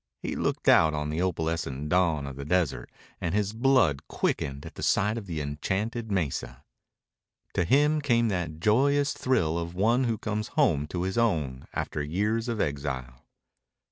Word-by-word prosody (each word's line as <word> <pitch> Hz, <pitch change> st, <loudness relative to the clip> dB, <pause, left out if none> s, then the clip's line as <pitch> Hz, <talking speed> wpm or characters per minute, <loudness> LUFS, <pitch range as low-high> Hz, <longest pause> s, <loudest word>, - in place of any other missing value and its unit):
He -, -, -3 dB
looked -, -, -2 dB
out 80 Hz, -1 st, +6 dB
on 75 Hz, 0 st, -2 dB
the 80 Hz, +3 st, -1 dB
opalescent 80 Hz, -5 st, -2 dB
dawn 85 Hz, -5 st, +2 dB
of 70 Hz, -1 st, -6 dB
the 70 Hz, -, -6 dB
desert, 80 Hz, -2 st, 0 dB, 0.3 s
and 85 Hz, +2 st, -1 dB
his 105 Hz, 0 st, 0 dB
blood 115 Hz, -, +2 dB
quickened 70 Hz, +1 st, -2 dB
at -, -, -8 dB
sight 105 Hz, +2 st, +2 dB
of 110 Hz, -4 st, -6 dB
the 80 Hz, -3 st, -3 dB
enchanted 100 Hz, +10 st, -3 dB
mesa. 70 Hz, -8 st, -2 dB, 0.9 s
To -, -, +1 dB
him 150 Hz, -, +3 dB
came 120 Hz, -5 st, +2 dB
that 85 Hz, -5 st, -3 dB
joyous 140 Hz, -, +3 dB
thrill 85 Hz, -11 st, +1 dB
of 85 Hz, +1 st, -5 dB
one 115 Hz, +7 st, +2 dB
who 115 Hz, -2 st, 0 dB
comes 105 Hz, 0 st, -3 dB
home 80 Hz, -, +3 dB
to 90 Hz, +2 st, -3 dB
his 95 Hz, +4 st, -1 dB
own 75 Hz, -, 0 dB
after -, -, -3 dB
years 105 Hz, +10 st, -1 dB
of 115 Hz, -2 st, -2 dB
exile. 65 Hz, -6 st, -3 dB
90 Hz, 165 wpm, -27 LUFS, 75-110 Hz, 0.9 s, out